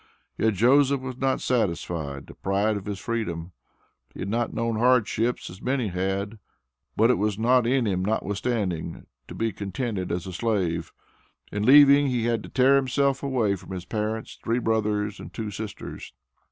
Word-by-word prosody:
Yet, 110 -1 +1
Joseph 135 +6 +4
was 130 -1 -6
not 135 0 0
satisfied, 85 - -1
deprived 100 +3 -1
of 95 - -12
his 100 -2 -3
freedom. 95 -6 -3 0.6
He - - -7
had 100 - -3
not 115 +2 0
known 115 -1 -1
hardships 120 0 +2
as 90 - -10
many 130 -4 0
had, 95 +4 -2 0.6
but 115 +3 +5
it - - +1
was 105 -1 0
not 120 +2 +3
in 130 -1 +2
him 95 -3 0
notwithstanding, 100 -3 -2 0.2
to - - -9
be 115 0 -1
contented 100 0 -4
as 85 0 -2
a 95 - -6
slave. 90 -6 -1 0.6
In 105 - -2
leaving, 140 +1 +8
he 125 -3 0
had 115 -2 +1
to - - -10
"tear 135 +2 +4
himself 135 +1 +1
away" 125 -8 +1
from 95 - -13
his 90 -1 -6
parents, 110 +2 -3
three 115 +1 +1
brothers, 105 -3 0
and 85 - -9
two 105 +3 -5
sisters. 105 +1 -7
110 Hz, 165 wpm, -25 LUFS, 95-125 Hz, 0.6 s, leaving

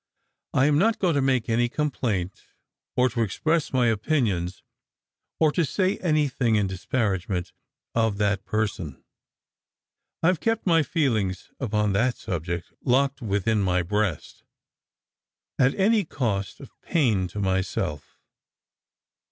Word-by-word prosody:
I 130 - +4
am 145 0 +3
not 220 +5 +3
going 180 -4 +1
to 140 - +2
make 130 -3 +1
any 120 +1 +2
complaint, 115 - -2 0.5
or 125 0 +4
to 120 0 -2
express 155 +9 0
my 130 -2 +2
opinions, 105 - 0 0.8
or 155 -2 +4
to 170 - +1
say 185 +5 0
anythiag 140 -9 +1
in 105 - +2
disparagement 95 -2 -2 0.4
of 110 -3 +1
that 100 -1 0
person. 100 -7 -3 1.2
I - - +4
have 180 - +1
kept 225 0 0
my 165 -3 +4
feelings 115 - -1
upon 105 -5 0
that 120 +5 +1
subject 85 0 -4
locked 140 +2 +2
within 105 0 0
my 90 -2 +1
breast, 100 -1 -2 1.2
at 135 +1 +4
any 210 +2 +3
cost 110 - -2
of - - -12
pain 110 - +1
to 95 +4 -7
myself. 95 -6 -2
115 Hz, 125 wpm, -25 LUFS, 95-140 Hz, 1.2 s, I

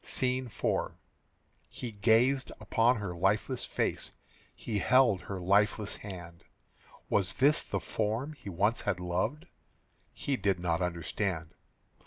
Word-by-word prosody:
SCENE 130 0 0
IV. 115 - -1 0.7
He 120 - -6
gazed 115 +6 +3
upon 115 +3 +3
her 100 -6 -4
lifeless 85 - +1
face, - - -2 0.4
He 105 -3 -3
held 120 -3 +4
her 95 -2 -5
lifeless 100 +3 +2
hand. 85 -4 -9 0.6
Was 95 -2 +1
this 145 +3 +4
the - - -3
form 110 +8 -2
he 120 -9 -9
once 100 +6 +1
had 95 -3 -1
loved? 90 - -2 0.7
He 140 -2 -2
did 95 -2 +1
not 85 0 0
understand. 85 0 -2
105 Hz, 125 wpm, -31 LUFS, 90-120 Hz, 0.7 s, held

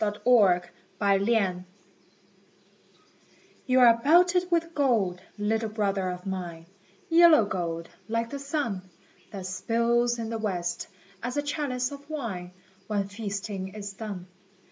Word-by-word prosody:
THE 210 -1 -1
HOMING 200 -8 +5 0.4
BEE 200 -2 +2 2.0
You 255 0 +4
are 235 -2 +7
belted 355 +6 +4
with 335 -1 0
gold, 220 - +1 0.2
little 220 +2 0
brother 200 -3 -1
of 180 +1 -6
mine, 175 -4 -5 0.4
Yellow 330 -7 +7
gold, 170 -4 -3 0.2
like 230 +1 -1
the 280 - -4
sun 270 -10 -3 0.4
That 195 -3 -7
spills 235 +5 +1
in 230 -1 -4
the 225 - -3
west, 175 -5 -2 0.3
as 245 +3 -3
a 290 - +1
chalice 285 -4 -2
of 285 +1 -10
wine 220 -13 -4 0.4
When 200 -2 -1
feasting 200 -2 -5
is 200 -2 -6
done. 195 -3 -6
220 Hz, 125 wpm, -27 LUFS, 190-250 Hz, 2.0 s, are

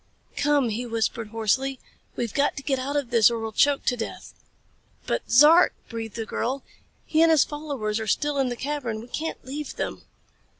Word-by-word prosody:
"Come," 285 -4 +2
he 225 +3 -3
whispered, 230 0 -1
hoarsely. 225 +5 0 0.4
"We've 235 -3 -3
got 285 0 +1
to 270 - -5
get 270 -2 0
out 275 +3 -3
of 280 -5 -1
this 230 -2 +6
or 235 - -2
we'll 225 0 -4
choke 280 +6 +2
to 245 - +2
death." 230 -2 -6 0.7
"But - - -2
Zark," 305 +7 +7
breathed 225 -2 -6
the 225 -1 -3
girl, 260 +5 -3 0.4
"He 315 - +2
and 330 - +6
his 315 -3 +6
followers 280 -8 -3
are 220 - -4
still 295 +4 0
in 265 -2 +1
the 245 - -3
cavern. 255 -4 -3
We 230 - -10
can't 315 +3 -5
leave 285 +2 -6
them." - - -4
255 Hz, 195 wpm, -25 LUFS, 225-290 Hz, 0.7 s, Zark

